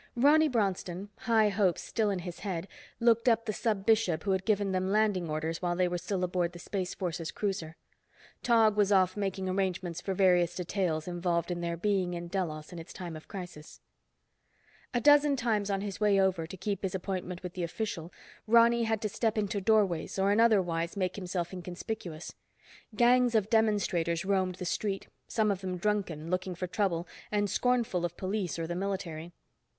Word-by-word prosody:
Ronny 295 +6 +5
Bronston, 195 -4 -1
high 220 -3 +3
hopes 195 -3 +1
still 220 -2 0
in 195 - 0
his 175 -1 -7
head, 190 -3 -4 0.3
looked 235 +1 +4
up 230 0 +2
the 215 - -2
Sub 205 -2 -1
Bishop 215 -8 +2
who 200 - 0
had 190 0 0
given 205 -3 +1
them 185 0 0
landing 205 -5 +2
orders 155 +1 -2
while 175 -1 0
they 180 0 +2
were 175 0 -2
still 185 +2 -2
aboard 175 -1 0
the - - -9
Space 185 +1 -4
Forces 170 -3 -3
cruiser. 185 -6 -3 0.7
Tog 225 -3 +4
was 205 -1 +3
off 185 -2 +4
making 195 -2 -2
arrangements 185 -2 -2
for 195 - -3
various 180 -2 +3
details 175 -3 -1
involved 175 -1 -1
in 175 0 -3
their 170 0 -2
being 185 -2 0
in 170 0 -6
Delos 165 -4 -3
in 175 - -7
its 165 - -10
time 175 -3 -6
of 155 - -11
crisis. 175 -6 -9 1.1
A 245 - +1
dozen 290 +1 +5
times, 220 -5 0
on 195 -1 0
his 200 -2 -5
way 205 -2 +4
over 185 -4 +1
to 190 - -9
keep 200 +1 -3
his 190 -1 -2
appointment 185 -1 -4
with 180 -1 -6
the 185 - -5
official, 170 -1 -4 0.4
Ronny 235 +1 +5
had 220 0 -1
to - - +1
step 220 +1 -1
into 205 -1 -1
doorways, 195 -6 +2
or 195 +1 +3
in 205 - +3
other 220 -4 +5
wise 170 +1 -3
make 185 -2 -1
himself 180 -2 -3
inconspicuous. 180 -1 -6 0.6
Gangs 245 +1 +4
of 215 -1 +1
demonstrators 190 -6 +1
roamed 190 -2 +1
the 180 - -6
street, 195 +2 -2 0.2
some 215 -2 +1
of 195 -1 -3
them 185 -1 -3
drunken, 175 -5 -2
looking 185 0 -1
for 180 - -3
trouble, 175 -2 -1 0.2
and 205 -1 +1
scornful 235 -4 +1
of 175 0 -3
police 190 -3 -2
or 165 - -2
the 170 - -3
military. 175 -3 -4
190 Hz, 190 wpm, -30 LUFS, 175-210 Hz, 1.1 s, Ronny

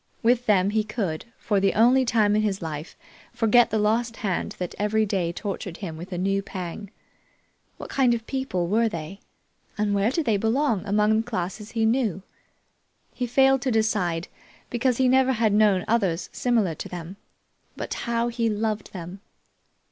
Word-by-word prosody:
With 245 +1 +2
them 200 -2 +3
he 215 0 +1
could, 210 -7 -3
for 205 -3 0
the 195 0 +1
only 250 +4 +5
time 215 -3 +3
in 215 - +3
his 200 -2 -1
life, 160 -1 -6 0.3
forget 235 +1 +4
the 220 - 0
lost 225 +2 +1
hand 195 -5 -2
that 180 -1 -4
every 215 +1 +2
day 190 -5 -1
tortured 185 -1 -5
him 175 -6 -6
with 175 +4 -9
a 180 - -3
new 195 +2 0
pang. 195 0 -7 0.9
What - - -8
kind 255 -3 +3
of 225 -1 -6
people 260 -11 -2
were 225 +4 +2
they 170 +1 -7 0.6
and 210 -1 0
where 200 +2 +2
did 305 +4 -1
they 220 -4 +2
belong 225 0 +1
among 210 +2 +3
the 225 - -12
classes 205 +1 -4
he 225 -1 +1
knew? 220 -6 0 0.9
He 250 - -3
failed 270 +2 +4
to 260 - -1
decide, 210 -7 0 0.4
because 245 0 +1
he 260 - +3
never 265 +1 +4
had 220 -3 +1
known 205 -3 +3
others 190 -7 0
similar 225 -8 +1
to - - -7
them; 175 +2 -7 0.6
but - - -4
how 235 0 -1
he 230 -1 0
loved 215 -1 -2
them! 180 +1 -8
215 Hz, 175 wpm, -25 LUFS, 190-235 Hz, 0.9 s, only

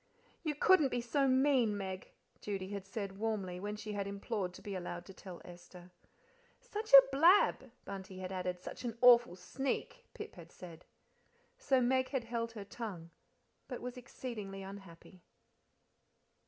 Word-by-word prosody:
"You 310 -3 -2
couldn't 310 -2 +5
be 245 - -1
so 270 +4 +1
mean, 260 -5 +3
Meg," 190 -1 -5 0.3
Judy 195 -2 -4
had 200 -1 -6
said 195 -1 -5
warmly, 200 -5 -2
when 205 +2 -4
she 210 0 -6
had 200 -1 -2
implored 200 -1 -3
to - - -11
be 205 - -5
allowed 175 -1 -5
to 195 - -11
tell 185 -2 -10
Esther. 175 0 -13 0.7
"Such 435 +2 -6
a - - +12
blab!" 330 -3 +5 0.2
Bunty 190 -1 -7
had 185 0 -5
added. 180 -1 -3
"Such - - -8
an 235 -2 -4
awful 240 -6 +7
sneak!" 270 - -4
Pip - - -7
had - - -13
said. 170 -3 -11 0.7
So 265 -2 +3
Meg 260 +1 +2
held 235 -3 -2
her 210 -3 -7
tongue, 195 -6 -7 0.6
but 250 - -5
was 250 +1 -6
exceedingly 215 -6 -7
unhappy. 190 -2 -11
205 Hz, 155 wpm, -34 LUFS, 185-250 Hz, 0.7 s, a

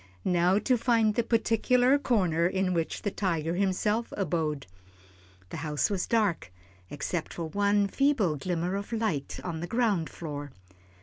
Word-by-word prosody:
Now 180 +1 +3
to 250 +3 +1
find 225 -3 +3
the 235 - +2
particular 245 +3 +2
corner 180 - +2
in 185 0 0
which 165 -2 -2
the 205 - -1
tiger 165 -5 -1
himself 200 +4 0
abode. 155 -7 -1 0.8
The - - -6
house 150 +5 -1
was 190 -3 -1
dark, 205 - 0 0.4
except 155 +3 -4
for 170 - -3
one 205 +2 +2
feeble 230 - +1
glimmer 175 +4 -2
of 200 +3 -5
light 220 -12 -2
on 170 -3 -4
the 175 - -4
ground 215 -8 +1
floor. 145 -4 -7
190 Hz, 145 wpm, -28 LUFS, 165-220 Hz, 0.8 s, Now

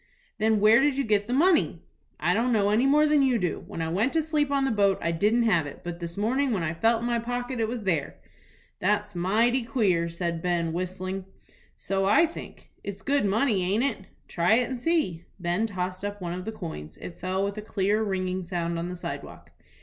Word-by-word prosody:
"Then 220 0 +3
where 215 +4 +6
did 280 -1 +2
you 275 - +1
get 210 -3 +1
the - - -4
money?" 310 - +3 0.4
"I 170 +4 +2
don't 235 +5 +1
know 205 -3 +2
any 235 +5 +3
more 300 +2 +5
than 300 -1 +4
you 260 -3 +3
do. 180 -7 -2
When 165 - -4
I - - -2
went 205 +10 0
to 325 -1 +2
sleep 300 -2 0
on 280 -1 +1
the 265 - +1
boat 200 -3 +3
I 170 - -1
didn't 210 +8 +2
have 175 -9 +2
it, 145 - -10
but 175 0 -6
this 170 0 -6
morning 255 +7 +1
when 200 -8 0
I 155 0 -1
felt 225 +6 +2
in - - -3
my 240 -1 +1
pocket 245 +1 -3
it 225 - +1
was 235 -1 -4
there." 165 -7 -1 0.6
"That's 205 +1 0
mighty 220 +8 +2
queer," 205 -8 +1
said 170 -1 -3
Ben, 170 -2 0
whistling. 185 +2 -4 0.5
"So 195 0 -1
I 210 +12 +5
think." 330 - -10
"It's 195 -1 -7
good 280 -5 +1
money, 210 0 +2
aint 200 +6 +1
it?" 270 -8 -2 0.2
"Try 175 +5 +2
it 245 +1 +1
and 255 - -3
see." 240 - 0
Ben 180 +5 0
tossed 185 -2 -4
up 205 0 -4
one 175 -2 -4
of 180 +1 -6
the 220 - -3
coins. 160 - -8
It 170 - -9
fell 190 +1 -1
with 200 +1 -4
a - - -5
clear, 210 0 0
ringing 185 -3 -1
sound 170 -1 -3
on 170 +1 -3
the 180 - -5
sidewalk. 175 - -8
205 Hz, 225 wpm, -26 LUFS, 180-240 Hz, 0.6 s, where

